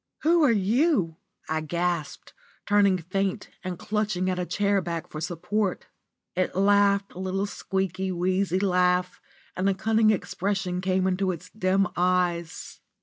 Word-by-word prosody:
Who 335 +1 +4
are 275 - +5
you?" 210 - +2 0.3
I 160 0 -1
gasped, 170 0 -3 0.3
turning 205 -2 +4
faint 185 +3 -2
and 185 -2 -4
clutching 205 -2 -1
at 180 - -2
a 180 - -2
chair 200 -1 +1
back 170 -2 -4
for 155 - -7
support. 185 +4 -2 0.5
It 185 0 -1
laughed 200 0 +3
a - - -9
little 190 +1 -1
squeaky, 190 -2 -2
wheezy 185 +1 0
laugh, 180 -1 +1 0.3
and 185 +2 +1
a 195 - +1
cunning 220 +1 +3
expression 190 -3 -1
came 185 0 +1
into 190 0 +1
its 170 - -8
dim 195 -2 +1
eyes. 175 -2 -1
185 Hz, 145 wpm, -26 LUFS, 180-200 Hz, 0.5 s, are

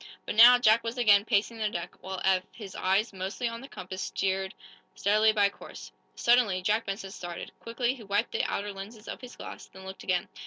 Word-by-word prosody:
But - - -3
now, 240 +3 +9
Jack 230 -1 +4
was 230 +2 -4
again 205 -4 +5
pacing 225 +1 0
the 215 -1 0
deck, 175 -4 -5
while 190 0 -5
Eph, 190 -1 +4
his 200 -5 -10
eyes 195 +4 +1
mostly 190 +6 -3
on 230 0 -5
the 270 - -9
compass, 185 -5 -7
steered 190 0 -2 0.4
steadily 215 +2 +3
by 205 -2 +3
course. - - -11 0.2
Suddenly, 235 -7 +3
Jack 215 +4 +1
Benson 195 0 -4
started. 175 -2 -7
Quickly 240 +2 -1
he 260 - -12
wiped 205 +2 -1
the - - -1
outer 205 0 -3
lenses 210 +3 -10
of - - -6
his 250 -1 -10
glass, - - -9
then 190 0 -13
looked 190 0 -8
again. 180 -1 0
205 Hz, 205 wpm, -28 LUFS, 190-230 Hz, 0.4 s, now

